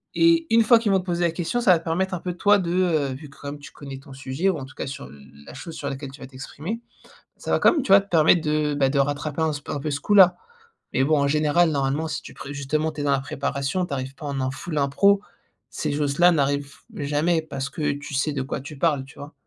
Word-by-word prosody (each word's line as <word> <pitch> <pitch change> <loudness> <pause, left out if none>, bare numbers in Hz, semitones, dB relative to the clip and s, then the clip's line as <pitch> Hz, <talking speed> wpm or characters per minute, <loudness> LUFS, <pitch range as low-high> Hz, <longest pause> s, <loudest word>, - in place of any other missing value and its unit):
et 335 0 +4
une 230 0 +5
fois 230 +1 +6
qu'ils 215 -3 0
vont 190 - +4
te 180 - -8
poser 175 -1 -1
la 170 - +2
question 175 +8 -2
ça 190 - +5
va 165 - +2
te - - -17
permettre 185 +3 -1
un 175 - -5
peu 180 0 -4
toi, 205 +3 +4
de, 175 -3 -2
heu, 170 -6 +2
vu 145 +2 -10
comme 145 +1 -8
tu 145 - -12
connais 135 -2 -9
ton 135 0 -13
sujet 135 +7 -1
ou 175 - 0
en 135 - -6
tout 135 - -14
cas - - -5
sur 135 - -7
l 70 +2 -13 0.3
la - - -11
chose 165 -2 -8
sur 140 - -5
laquelle 135 0 -5
tu 140 - -13
vas - - -8
t'exprimer. 145 - -7 0.6
Ça - - -3
va - - +2
quand - - +7
même 305 -6 0
tu 195 - +1
vois? 200 - +9
Te 200 - -14
permettre 165 +1 +5
de 150 -1 0
bah, 140 -2 +2
de 140 +1 0
rattraper 145 +2 -1
un 160 - +2
s 145 0 -6
un 150 - -2
peu 150 +2 -3
ce 140 - -2
coup-là, 185 -1 +6 0.6
mais 130 - +2
bon 150 +2 +3
en 140 - +2
général 155 +3 +3
normalement 140 +3 0
si 150 - -4
tu - - -12
pré 140 - -8
justement 150 +3 -1
tu 150 - -6
es - - -2
dans 145 - 0
la 135 - +2
préparation, 140 +3 -2
tu - - -5
arrives 130 0 -4
pas 150 - -8
en 140 -1 -3
un 130 0 -1
full 155 +3 -6
impro. 170 +9 +3 0.5
Ces 150 -2 -2
choses-là 150 +4 +3
n'arrivent 140 -2 0 0.2
jamais 150 +3 +1
parce 135 -3 -5
que 150 -1 -1
tu 145 0 -8
sais 140 +2 0
de 135 -2 -2
quoi 135 - -4
tu 150 +1 -9
parles, 145 -3 +1
tu 135 - -16
vois? 145 +1 -9
150 Hz, 275 wpm, -24 LUFS, 140-175 Hz, 0.6 s, vois